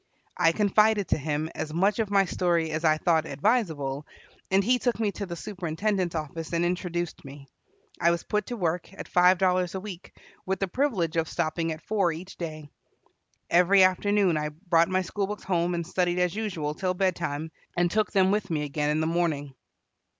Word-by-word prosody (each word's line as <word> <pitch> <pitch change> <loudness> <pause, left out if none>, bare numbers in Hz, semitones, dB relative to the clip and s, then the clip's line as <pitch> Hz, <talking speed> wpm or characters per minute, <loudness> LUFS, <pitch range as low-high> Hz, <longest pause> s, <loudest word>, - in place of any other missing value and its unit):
I 165 - +4
confided 210 +2 +3
to - - +2
him 150 +2 -2
as 155 - -4
much 195 +6 +2
of 220 -3 0
my 200 -1 +4
story 170 -3 0
as 155 +1 -3
I 155 -1 +4
thought 160 0 +1
advisable, 150 - 0 0.4
and 195 +1 +3
he 250 +4 +3
took 245 -2 -1
me 215 -3 +1
to 200 0 -6
the 170 - -5
superintendent's 185 0 -2
office 160 +1 -5
and 170 +1 +1
introduced 175 -1 -3
me. 140 0 -11 0.5
I 170 - +4
was 170 0 0
put 210 -1 -1
to 245 - -4
work, 175 -2 -2
at - - -8
five 180 +1 +5
dollars 180 0 +1
a - - -2
week, 185 -2 -10 0.2
with 190 +1 -2
the 195 - 0
privilege 185 - 0
of 160 -1 0
stopping 165 +1 -1
at 155 0 -7
four 200 -5 +1
each 180 +4 -8
day. 155 -3 -6 0.8
Every 185 +3 +6
afternoon 185 -1 +3
I 150 0 -1
brought 165 +1 +1
my 185 0 +1
school 195 +3 -2
books 210 +1 -6
home 175 -1 0
and 170 -1 -3
studied 175 0 0
as 180 -1 +1
usual 175 -9 -3
till 185 +3 -2
bed 185 -1 +1
time, 160 -1 -4 0.3
and 175 0 +2
took 215 0 +1
them 190 -1 +3
with 205 -1 0
me 155 -3 -1
again 150 0 -1
in 150 +1 +1
the - - 0
morning. 160 -4 -1
175 Hz, 200 wpm, -27 LUFS, 160-195 Hz, 0.8 s, Every